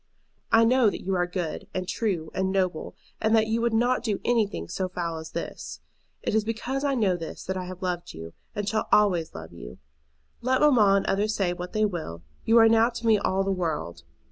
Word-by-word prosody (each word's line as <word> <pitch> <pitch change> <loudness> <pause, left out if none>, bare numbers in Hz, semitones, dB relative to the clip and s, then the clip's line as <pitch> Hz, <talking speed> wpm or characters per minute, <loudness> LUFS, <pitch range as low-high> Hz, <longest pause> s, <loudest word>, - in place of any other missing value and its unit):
I 230 0 +6
know 250 -1 +4
that - - -6
you 195 - -1
are 175 -1 +1
good, 175 -3 -4
and 185 -1 -2
true, 180 -9 -2
and 190 0 0
noble, 185 -4 -1 0.3
and 220 +1 +3
that 220 -1 +4
you 225 +1 0
would 235 0 +1
not 245 +3 +2
do 215 -4 -1
anything 225 -4 0
so 185 -1 -3
foul 170 -3 -3
as 160 0 -10
this. 80 +2 -6 0.4
It - - -1
is 220 0 +2
because 235 +5 -3
I 280 -1 +1
know 205 -7 +2
this 165 -2 -7
that 190 - -3
I 185 -1 -4
have 185 +1 -8
loved 175 -1 -3
you, 80 +1 -9 0.2
and 205 -1 -3
shall 215 +1 -1
always 180 -6 +3
love 80 +1 -9
you. - - -10 0.6
Let 255 +2 +1
mamma 230 -10 +5
and 195 - -1
others 210 +2 0
say 185 -4 0
what 180 0 -7
they 215 0 +2
will, 155 - -5 0.2
you 230 - +5
are 225 -1 +8
now 225 +1 +4
to 235 -1 -7
me 220 -2 +5
all 195 -1 0
the 195 - -1
world. 155 - -3
195 Hz, 220 wpm, -26 LUFS, 175-225 Hz, 0.6 s, are